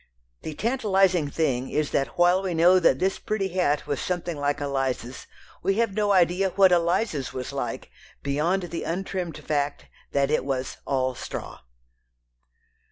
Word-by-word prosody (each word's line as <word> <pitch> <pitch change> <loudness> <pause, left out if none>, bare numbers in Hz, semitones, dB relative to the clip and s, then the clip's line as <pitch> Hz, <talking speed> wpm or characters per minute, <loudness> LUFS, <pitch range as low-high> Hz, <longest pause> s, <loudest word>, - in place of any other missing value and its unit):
The 155 - -6
tantalizing 195 - +2
thing 135 -5 -1
is 150 -1 -1
that 135 - -1
while 175 +2 +4
we 185 -3 -2
know 175 +3 +6
that 165 -7 +4
this 190 +6 0
pretty 200 -3 -2
hat 175 -5 0
was 140 - -2
something 175 -2 -2
like 145 0 -1
Eliza's, 135 -3 -3 0.3
we 195 - +1
have 230 -2 +1
no 210 0 +1
idea 185 +1 +3
what 190 0 +5
Eliza's 170 - +1
was 130 +1 -5
like, 120 -4 -4 0.3
beyond 155 +7 0
the 170 -1 -5
untrimmed 180 -1 -3
fact 145 -1 -2 0.3
that 140 0 +1
it 155 - +2
was 130 -1 -3
"all 130 -2 0
straw." - - -7
165 Hz, 155 wpm, -25 LUFS, 140-190 Hz, 0.3 s, know